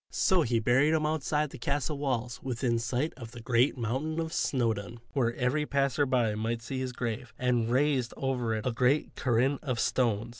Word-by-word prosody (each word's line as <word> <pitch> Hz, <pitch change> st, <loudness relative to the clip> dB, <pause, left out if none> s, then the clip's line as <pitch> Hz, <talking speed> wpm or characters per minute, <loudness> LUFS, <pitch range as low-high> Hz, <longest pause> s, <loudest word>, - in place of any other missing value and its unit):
So 185 Hz, -2 st, +2 dB
he 120 Hz, -5 st, +1 dB
buried 135 Hz, +8 st, +3 dB
him 155 Hz, -1 st, +1 dB
outside 150 Hz, -1 st, 0 dB
the 135 Hz, -, -9 dB
castle 145 Hz, +3 st, -1 dB
walls 125 Hz, -4 st, -2 dB
within 120 Hz, -2 st, -1 dB
sight 125 Hz, +6 st, -1 dB
of 115 Hz, -3 st, -9 dB
the 120 Hz, -, -8 dB
great 120 Hz, +4 st, +2 dB
mountain 135 Hz, +7 st, -2 dB
of 165 Hz, 0 st, -3 dB
Snowdon, 115 Hz, -3 st, -1 dB
where 120 Hz, -4 st, +1 dB
every 140 Hz, +4 st, 0 dB
passer 140 Hz, 0 st, +1 dB
by 120 Hz, -4 st, +2 dB
might 115 Hz, +2 st, -2 dB
see 130 Hz, +3 st, -4 dB
his 130 Hz, -1 st, -2 dB
grave, 120 Hz, -2 st, -4 dB
and 120 Hz, -2 st, +1 dB
raised 130 Hz, -1 st, +2 dB
over 125 Hz, -4 st, -1 dB
it 110 Hz, -, -4 dB
a 125 Hz, -, +1 dB
great 125 Hz, +5 st, +1 dB
cairn 130 Hz, +3 st, +1 dB
of 130 Hz, -6 st, -2 dB
stones. 115 Hz, -3 st, +1 dB
125 Hz, 190 wpm, -29 LUFS, 115-140 Hz, -, buried